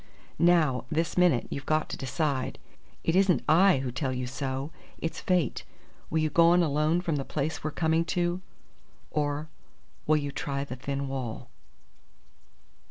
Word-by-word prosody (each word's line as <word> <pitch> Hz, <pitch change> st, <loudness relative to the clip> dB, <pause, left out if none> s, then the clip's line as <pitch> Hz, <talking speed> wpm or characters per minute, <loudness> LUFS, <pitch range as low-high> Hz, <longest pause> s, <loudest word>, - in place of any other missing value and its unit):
"Now, 155 Hz, -8 st, +3 dB
this 165 Hz, +1 st, -1 dB
minute, 175 Hz, -9 st, +4 dB
you've 140 Hz, -, -5 dB
got 155 Hz, 0 st, +1 dB
to -, -, -3 dB
decide. 135 Hz, 0 st, -2 dB, 0.5 s
It 165 Hz, -, +1 dB
isn't 190 Hz, -2 st, +4 dB
I 180 Hz, +1 st, +6 dB
who 125 Hz, -, -2 dB
tell 130 Hz, +2 st, -2 dB
you 125 Hz, 0 st, -2 dB
so. 135 Hz, +3 st, -4 dB, 0.3 s
It's 165 Hz, 0 st, -4 dB
fate. 180 Hz, -8 st, 0 dB, 0.5 s
Will 160 Hz, -, 0 dB
you 155 Hz, -1 st, +1 dB
go 170 Hz, +2 st, +6 dB
on 175 Hz, +1 st, +5 dB
alone 155 Hz, +3 st, +1 dB
from 165 Hz, -4 st, -1 dB
the 135 Hz, -, -2 dB
place 150 Hz, +3 st, -3 dB
we're 155 Hz, -, 0 dB
coming 160 Hz, +2 st, +1 dB
to, 175 Hz, 0 st, -1 dB, 0.7 s
or 150 Hz, 0 st, -1 dB, 0.6 s
will 155 Hz, 0 st, +5 dB
you 145 Hz, -1 st, -3 dB
try 140 Hz, 0 st, -3 dB
the 135 Hz, -3 st, -6 dB
thin 140 Hz, +2 st, -3 dB
wall?" 125 Hz, -3 st, -5 dB
150 Hz, 160 wpm, -28 LUFS, 135-165 Hz, 0.7 s, I